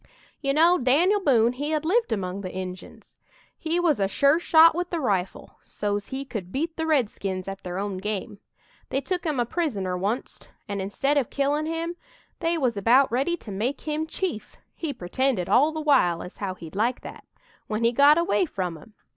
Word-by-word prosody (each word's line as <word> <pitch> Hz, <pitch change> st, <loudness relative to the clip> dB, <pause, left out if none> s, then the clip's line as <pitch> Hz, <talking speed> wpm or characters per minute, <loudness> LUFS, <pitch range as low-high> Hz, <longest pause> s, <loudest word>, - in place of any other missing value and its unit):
"You 275 Hz, -2 st, 0 dB
know, 335 Hz, +5 st, +4 dB
Dan'l 330 Hz, +11 st, +3 dB
Boone 245 Hz, -, +3 dB
he 290 Hz, +4 st, -4 dB
had 310 Hz, 0 st, -1 dB
lived 455 Hz, +7 st, +1 dB
among 195 Hz, -2 st, -2 dB
the 185 Hz, -2 st, -6 dB
Injuns. 185 Hz, 0 st, -8 dB, 0.4 s
He 330 Hz, +2 st, -1 dB
was 330 Hz, -7 st, +2 dB
a 195 Hz, -, +2 dB
sure 280 Hz, +9 st, +3 dB
shot 330 Hz, -1 st, +6 dB
with 355 Hz, +2 st, -3 dB
the 340 Hz, -, -2 dB
rifle 195 Hz, -, -2 dB
so's 205 Hz, -1 st, -3 dB
he 270 Hz, +1 st, -5 dB
could 205 Hz, -9 st, -6 dB
beat 320 Hz, -, -2 dB
the 320 Hz, 0 st, -2 dB
redskins 200 Hz, -, -1 dB
at 195 Hz, 0 st, -6 dB
their 180 Hz, 0 st, -5 dB
own 200 Hz, -1 st, -3 dB
game. 205 Hz, 0 st, -4 dB, 0.5 s
They 270 Hz, -, 0 dB
took 355 Hz, +6 st, -3 dB
him 295 Hz, -5 st, -1 dB
a 240 Hz, -, +2 dB
prisoner 225 Hz, -, -2 dB
oncet, 220 Hz, +6 st, -3 dB, 0.2 s
and 200 Hz, -1 st, -3 dB
instead 275 Hz, +9 st, +1 dB
of 255 Hz, -, -3 dB
killin' 290 Hz, +2 st, 0 dB
him, 330 Hz, +2 st, -3 dB, 0.4 s
they 335 Hz, -1 st, 0 dB
was 250 Hz, -8 st, 0 dB
about 245 Hz, +7 st, +4 dB
ready 275 Hz, +8 st, 0 dB
to 220 Hz, -, -10 dB
make 230 Hz, +9 st, -2 dB
him 310 Hz, +1 st, -2 dB
chief 320 Hz, -, -4 dB, 0.2 s
he 320 Hz, -3 st, -4 dB
pretended 240 Hz, -2 st, -1 dB
all 295 Hz, +4 st, +4 dB
the 315 Hz, -, -5 dB
while 260 Hz, -, +3 dB
as 180 Hz, -, -10 dB
how 190 Hz, -3 st, -4 dB
he'd 165 Hz, -1 st, -11 dB
like 235 Hz, +5 st, 0 dB
that -, -, -10 dB, 0.4 s
when 215 Hz, +1 st, -2 dB
he 230 Hz, -, +4 dB
got 285 Hz, +5 st, +6 dB
away 345 Hz, +1 st, +2 dB
from 180 Hz, -, -4 dB
'em. 210 Hz, +7 st, -18 dB
260 Hz, 195 wpm, -25 LUFS, 200-315 Hz, 0.5 s, shot